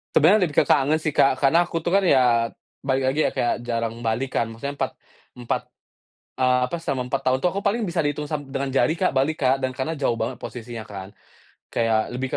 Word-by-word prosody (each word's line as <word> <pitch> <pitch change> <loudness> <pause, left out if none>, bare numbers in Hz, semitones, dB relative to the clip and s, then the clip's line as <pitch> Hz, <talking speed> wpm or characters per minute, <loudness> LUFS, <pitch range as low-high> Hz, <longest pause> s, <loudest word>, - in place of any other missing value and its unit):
Sebenarnya 180 +4 +5
lebih 145 - -11
ke - - -12
kangen 145 +1 +3
sih, 155 - 0
Kak, 140 - +4
karena 135 +5 +5
aku - - -9
tuh 175 - -1
kan - - +6
ya, 120 -3 +4 0.4
balik 135 0 +1
lagi 145 - -3
ya, - - -2
kayak 120 - +1
jarang 115 -1 -1
balik 120 +4 -1
kan. 115 - +2
Maksudnya 130 +6 -6
4, - - 0 0.5
4, 120 - -1 0.8
eee, 130 -1 +3
apa? - - -2
Selama 135 -5 -1
4 - - 0
tahun 130 0 +3
itu - - +3
aku 200 - -3
paling 230 +4 0
bisa 170 0 -2
dihitung 145 0 -2
sam 150 -2 -2
dengan 135 0 -1
jari, 135 +4 +2
Kak, 165 - +1
balik, 140 +4 +2
Kak, 130 0 +4
dan 130 -1 -2
karena 145 +5 -3
jauh 135 -4 +1
banget 120 +3 -2
posisinya 115 -2 -7
kan. 95 -2 -8 0.6
Kayak 115 0 0
lebih 130 +1 -2
130 Hz, 220 wpm, -23 LUFS, 120-150 Hz, 0.8 s, kan